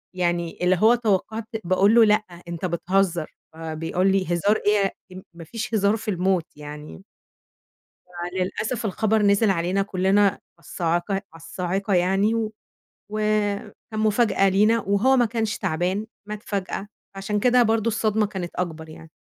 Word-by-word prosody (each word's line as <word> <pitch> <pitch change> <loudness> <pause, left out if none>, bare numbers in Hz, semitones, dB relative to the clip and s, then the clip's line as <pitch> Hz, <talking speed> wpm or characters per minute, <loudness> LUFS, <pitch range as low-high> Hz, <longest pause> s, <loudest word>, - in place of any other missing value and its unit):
يعني 175 -2 -1
اللي 180 +1 +3
هو 225 +3 +6
توقعت 220 0 -1 0.2
باقول 190 +5 +3
له: 230 -1 +7
"لأ، 210 +1 +4 0.3
أنت 170 +1 -4
بتهزر." 175 -1 0 0.2
فبيقول 165 +4 -1
لي: 190 -1 +1
"هزار 200 +5 +2
إيه 205 -2 +3 0.2
يا 185 +1 -10
ما 170 -1 -10
فيش 230 +7 -6
هزار 205 +1 +2
في 220 -1 -3
الموت." 185 -2 +1
يعني 150 +4 -10 1.3
فللأسف 215 +6 -2
الخبر 220 +2 +1
نزِل 200 +1 +3
علينا 185 +2 +1
كلّنا 195 +1 +2 0.2
الصاعقة 170 +4 -2
على 195 - -1
الصاعقة 180 +4 -3
يعني 195 +5 +2
و 220 -1 -1 0.6
وكان 215 +1 -2
مفاجأة 215 -2 +3
لينا، 215 +4 +3
وهو 205 +7 +2
ما 245 - +4
كانش 225 -2 -2
تَعبان، 185 +3 -1 0.2
مات 210 +1 -7
فجأة، 200 0 -4 0.3
فعشان 195 +2 -2
كده 245 +2 +4
برضه 225 0 +1
الصدمة 215 -1 +1
كانت 190 -4 -5
أكبر 160 -3 -4
يعني. 160 0 -13
195 Hz, 145 wpm, -23 LUFS, 180-215 Hz, 1.3 s, له